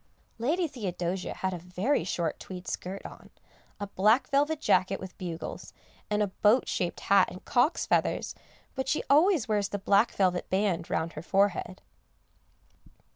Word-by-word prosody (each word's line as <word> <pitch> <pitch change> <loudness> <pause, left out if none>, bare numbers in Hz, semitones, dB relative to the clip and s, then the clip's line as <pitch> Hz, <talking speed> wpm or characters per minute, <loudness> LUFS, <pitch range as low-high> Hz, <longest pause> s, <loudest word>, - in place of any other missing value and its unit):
Lady 325 +9 +1
Theodosia 185 - -4
had 190 0 -2
a 175 - -5
very 180 - 0
short 170 -2 -2
tweed 185 -1 -9
skirt 190 +2 -5
on, - - -11 0.5
a 205 - -3
black 210 +5 +3
velvet 290 +2 +2
jacket 190 -7 +2
with 190 -1 -9
bugles, 170 -3 -6 0.4
and 210 0 +2
a - - 0
boat 215 +5 +4
shaped 175 - -2
hat 195 -1 +4
and 185 - -11
cocks' 250 +7 +2
feathers; - - 0 0.4
but 265 -1 -3
she 305 - 0
always 315 - +4
wears 205 -2 0
the 205 - -2
black 200 +3 +3
velvet 180 -2 0
band 190 -3 0
round 165 +1 -1
her 155 - -6
forehead. 190 0 0
195 Hz, 155 wpm, -28 LUFS, 180-240 Hz, 0.5 s, boat